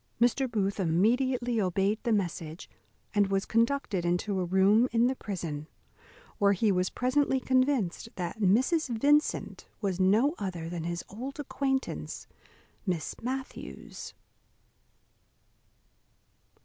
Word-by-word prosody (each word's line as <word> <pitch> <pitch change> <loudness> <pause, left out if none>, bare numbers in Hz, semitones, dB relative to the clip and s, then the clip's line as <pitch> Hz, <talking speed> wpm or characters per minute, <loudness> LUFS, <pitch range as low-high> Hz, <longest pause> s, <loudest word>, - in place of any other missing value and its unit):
Mr. 245 +2 +2
Booth 200 -3 -1
immediately 235 +7 +2
obeyed 195 +3 +1
the 235 - -1
message, 170 -5 -2 0.5
and 205 -1 +3
was 195 0 0
conducted 230 -5 +1
into 180 +3 0
a - - 0
room 195 +7 +4
in 230 +1 +3
the 260 +2 +1
prison, 165 - -5 0.7
where 200 0 +5
he 205 +2 +2
was 180 0 +1
presently 265 +1 +1
convinced 255 -6 +1
that 180 +3 -4
Mrs. 260 - +3
Vincent 290 +6 +1
was 195 -3 -2
no 215 - +4
other 175 -4 -4
than 170 -2 -4
his 170 0 -3
old 260 +8 -7
acquaintance 270 -1 -2 0.6
Miss 180 -6 -2
Matthews. 260 +3 -6
210 Hz, 115 wpm, -29 LUFS, 185-255 Hz, 0.7 s, where